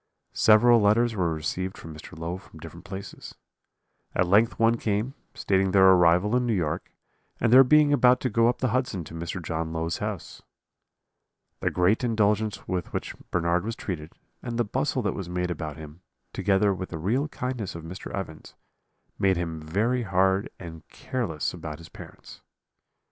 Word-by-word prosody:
"Several 115 +2 +5
letters 115 +3 +3
were 90 -4 0
received 90 +4 -3
from 80 - -9
Mr. 75 - -11
Low 85 +2 -4
from - - -16
different - - -11
places; 95 0 -8 0.8
at 90 - +3
length 105 +6 +3
one 115 +1 +3
came, 110 +4 -1 0.2
stating 95 -1 +1
their 95 -1 +6
arrival 90 +4 +4
in 125 -1 +1
New 115 - +1
York, 80 -5 -2 0.5
and 115 0 +2
their 130 +1 +10
being 150 +2 +5
about 125 -2 +5
to 130 - 0
go 115 +2 +4
up 125 - -2
the 130 - +1
Hudson 120 -7 -1
to 80 - -12
Mr. 85 +3 -5
John 80 0 -3
Low's 80 0 -2
house. - - -5 1.2
"The - - 0
great 90 +7 +2
indulgence 110 -2 0
with 90 -2 -3
which - - -3 0.2
Bernard 85 0 +1
was 115 +2 -4
treated, 80 -5 -6 0.3
and 120 -1 -5
the 120 - +1
bustle - - -1
that - - 0
was 95 -3 -6
made 90 0 -2
about 80 -3 -5
him, 80 +2 -11 0.3
together 100 0 +2
with 95 0 -6
the 80 - -5
real 115 - 0
kindness 125 - -4
of 85 - -7
Mr. 90 +5 -8
Evans, 85 -5 -7 0.6
made 95 -2 +3
him 80 -2 -4
very 105 +11 0
hard 95 -1 +1
and 80 -3 -9
careless 110 - -3
about 80 -4 -7
his 85 0 -13
parents. - - -13
95 Hz, 175 wpm, -26 LUFS, 85-115 Hz, 1.2 s, their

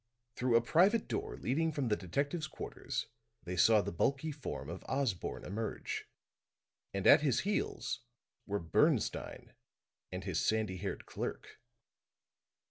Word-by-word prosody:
Through 125 -1 +2
a 115 - +7
private 190 - +4
door - - -3
leading 160 +6 +1
from 140 -5 -1
the 105 - +3
detectives' 140 - -1
quarters - - -4 0.4
they 90 - -4
saw 110 +4 +6
the - - -3
bulky 140 - 0
form 135 - -5
of 85 +4 -6
Osborne 130 -10 -1
emerge; 105 +3 -3 0.9
and 100 -1 -3
at - - +9
his 140 -6 +2
heels 205 +1 -1 0.5
were 100 0 0
Bernstine 85 -4 +1 0.6
and - - -4
his - - 0
sandy 110 -4 +1
haired 100 +2 -4
clerk. - - -5
115 Hz, 130 wpm, -34 LUFS, 100-145 Hz, 0.9 s, at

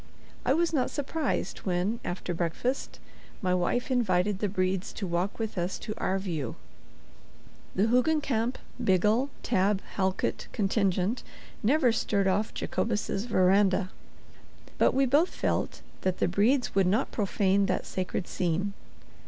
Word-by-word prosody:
I 260 - +4
was 335 0 +1
not 265 -5 +2
surprised 290 0 -2
when, 190 +5 -1
after 175 0 -3
breakfast, 175 +10 -2 0.4
my 185 -3 +1
wife 210 +9 0
invited 205 -5 +2
the 205 - 0
Bredes 185 0 -1
to 200 - -4
walk 175 +2 -1
with 220 -4 -3
us 175 +2 -1
to 215 - -5
"our 190 - +1
view." 165 - -3 1.2
The 190 - +3
Hoogencamp 250 -1 +2 0.3
Biggle 215 +7 +3
Tabb 195 +1 +2 0.2
Halkit 190 -1 -1
contingent 195 +1 +1 0.4
never 255 +2 +4
stirred 200 -3 +1
off 200 +3 +1
Jacobus's 210 -2 -1
veranda; 190 -2 +3 0.9
but - - +4
we 270 0 +4
both 290 +7 +3
felt - - -1 0.2
that 185 -1 0
the - - +2
Bredes 215 +6 +2
would 195 -2 +3
not 200 +4 +1
profane 200 -1 +2
that 185 - -1
sacred 185 0 -3
scene. 185 +3 -1
200 Hz, 135 wpm, -28 LUFS, 185-235 Hz, 1.2 s, I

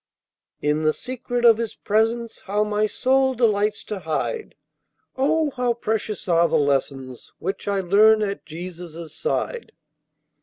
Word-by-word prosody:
"In 150 +1 +1
the 155 0 +2
secret 245 -1 -3
of 230 -1 +7
His 230 -2 -3
presence 225 +2 0
how 205 +2 0
my 210 0 +1
soul 265 +4 +2
delights 210 -3 +1
to 210 - -5
hide! 175 - -3 0.6
Oh, 300 +3 +1
how 245 -2 +1
precious 220 -2 -3
are 170 -1 +4
the 160 - +1
lessons 135 -3 -1
which 190 +3 -4
I 200 -1 +1
learn 215 +4 +5
at 200 -1 -3
Jesus' 170 -1 -8
side!" 480 0 -3
210 Hz, 140 wpm, -23 LUFS, 170-235 Hz, 0.6 s, of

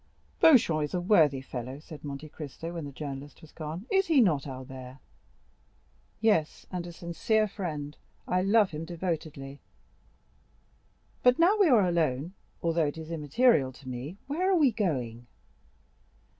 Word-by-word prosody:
"Beauchamp 220 - +6
is 150 - -3
a - - +1
worthy 160 -8 +4
fellow," 130 0 -6
said 155 0 -12
Monte 145 +1 -6
Cristo, 160 +2 -7
when 165 -3 -5
the 140 - -7
journalist 140 0 -7
was 160 - -15
gone; 160 +5 -6
"is 385 0 +3
he 315 -4 +4
not, 155 - +3
Albert?" 130 -1 -8 1.2
"Yes, 205 -9 +1
and 180 -2 -4
a - - -7
sincere 175 +6 0
friend; 155 -7 -5 0.3
I 180 - +1
love 200 +1 +4
him 155 0 -5
devotedly. 160 -5 -4 1.6
But 250 0 +5
now 350 +5 +5
we 390 -5 +5
are 215 -8 +5
alone,—although 165 +1 -1
it 145 - -5
is 160 0 -8
immaterial 150 - +3
to 130 +1 -15
me,—where 195 - -3
are - - +4
we 290 -6 +5
going?" 125 - -2
160 Hz, 145 wpm, -29 LUFS, 140-200 Hz, 1.6 s, Beauchamp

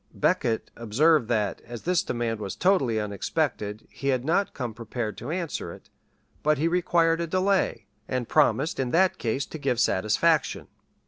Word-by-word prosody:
[*] - - -36
Becket 115 -1 0
observed 120 +5 +3
that, 105 -4 0
as 120 -1 -9
this 180 0 +2
demand 120 - -2
was 100 -3 -5
totally 140 - +2
unexpected, 105 +1 -2
he 135 - -6
had 130 -2 +1
not 180 +6 +1
come 125 -4 -4
prepared 115 -1 -4
to 120 - -6
answer 165 - -3
it; - - -14 0.5
but 150 0 +2
he 155 +4 +1
required 170 -1 +2
a 170 - -2
delay, 185 - +1 0.2
and 125 -2 -2
promised 150 0 +2
in 130 -2 0
that 185 +6 +2
case 125 +4 -1
to 160 - -8
give 135 -4 0
satisfaction. 115 - +2
130 Hz, 170 wpm, -26 LUFS, 115-165 Hz, 0.5 s, observed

